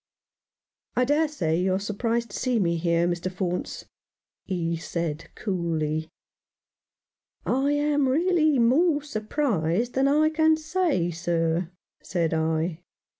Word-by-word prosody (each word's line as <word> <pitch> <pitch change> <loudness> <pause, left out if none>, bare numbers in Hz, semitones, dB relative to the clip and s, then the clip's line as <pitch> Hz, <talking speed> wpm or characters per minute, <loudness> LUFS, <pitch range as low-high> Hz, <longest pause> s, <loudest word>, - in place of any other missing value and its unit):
"I 250 - +3
dare 295 +4 +2
say 170 - -1
you 185 0 +1
are - - 0
surprised 225 +3 -2
to - - -7
see 255 -2 +1
me 170 -5 +1
here, 170 0 +1
Mr. 175 +1 -2
Faunce," 180 -1 -3 0.6
he 170 -3 -1
said 165 -1 -4
coolly. 160 -5 -2 1.4
"I 270 +3 +1
am 290 -2 +2
really 315 0 +3
more 290 +6 +3
surprised 220 - -1
than 265 +1 +2
I 305 +2 +4
can 315 0 +3
say, 315 - 0
sir," 165 0 -1 0.3
said 170 -3 -1
I. 160 +1 0
200 Hz, 125 wpm, -25 LUFS, -, 1.4 s, I